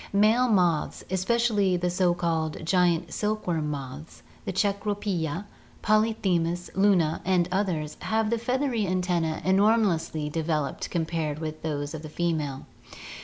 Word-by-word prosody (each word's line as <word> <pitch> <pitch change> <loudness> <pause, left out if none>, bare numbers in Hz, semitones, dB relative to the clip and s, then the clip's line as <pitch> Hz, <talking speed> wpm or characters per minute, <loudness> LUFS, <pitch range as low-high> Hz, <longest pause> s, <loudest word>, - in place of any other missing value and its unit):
Male 215 +5 +4
moths, 180 -8 +1
especially 200 -1 +2
the 175 0 -1
so 180 -1 +2
called 160 -2 -2
giant 175 -1 +2
silk 215 0 -1
worm 160 -4 -1
moths, 140 +2 -7 0.2
the - - -2
cecropia, 200 -3 -1 0.4
polyphemus, 190 -6 +1
luna, 185 -5 +3
and 180 -2 +2
others, 180 -6 -1
have 220 0 0
the 235 - +1
feathery 250 -3 0
antenna; 175 -3 0
enor 200 +4 +4
mously 160 -6 -1
developed 155 -2 -2
compared 160 -3 -2
with 155 0 -5
those 145 -2 -3
of 160 - -6
the 155 - -8
female. 155 -5 -2
175 Hz, 130 wpm, -26 LUFS, 160-205 Hz, 0.4 s, Male